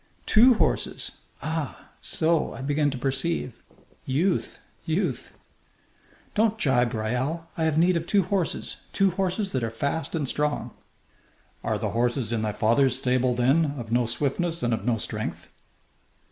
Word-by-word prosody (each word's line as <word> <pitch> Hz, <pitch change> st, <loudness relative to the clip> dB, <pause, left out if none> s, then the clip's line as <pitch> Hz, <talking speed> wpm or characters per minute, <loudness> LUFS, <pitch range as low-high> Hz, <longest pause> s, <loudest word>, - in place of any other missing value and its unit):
"Two 240 Hz, +3 st, +7 dB
horses! -, -, -1 dB, 0.2 s
Ah! 155 Hz, -4 st, -4 dB
So! 160 Hz, 0 st, +1 dB
I -, -, -7 dB
begin 145 Hz, +1 st, +2 dB
to 135 Hz, -, -4 dB
perceive. 135 Hz, +1 st, -1 dB, 0.4 s
Youth! 170 Hz, +8 st, 0 dB, 0.3 s
Youth!" 165 Hz, -, -2 dB, 1.0 s
"Don't 220 Hz, 0 st, +2 dB
jibe, 125 Hz, -, +2 dB
Raoul! 125 Hz, +10 st, -1 dB
I 160 Hz, -, 0 dB
have 155 Hz, -1 st, +1 dB
need 175 Hz, +2 st, +4 dB
of 165 Hz, 0 st, -2 dB
two 200 Hz, -2 st, +3 dB
horses 185 Hz, -1 st, -2 dB, 0.2 s
two 195 Hz, -1 st, +3 dB
horses 190 Hz, +2 st, -1 dB
that 130 Hz, -3 st, -1 dB
are 115 Hz, -, 0 dB
fast 140 Hz, +9 st, -2 dB
and 150 Hz, -4 st, -1 dB
strong." 150 Hz, +2 st, -1 dB, 0.9 s
"Are -, -, 0 dB
the -, -, -2 dB
horses 120 Hz, 0 st, 0 dB
in 115 Hz, -, 0 dB
thy 110 Hz, -1 st, 0 dB
father's 120 Hz, +5 st, +3 dB
stable, 125 Hz, -1 st, +1 dB
then, 140 Hz, +5 st, +2 dB
of 115 Hz, -3 st, -6 dB
no 120 Hz, 0 st, +2 dB
swiftness 150 Hz, +8 st, -1 dB
and 120 Hz, -1 st, +2 dB
of 110 Hz, -, -3 dB
no 120 Hz, -2 st, +2 dB
strength?" -, -, -5 dB
140 Hz, 150 wpm, -26 LUFS, 125-170 Hz, 1.0 s, Two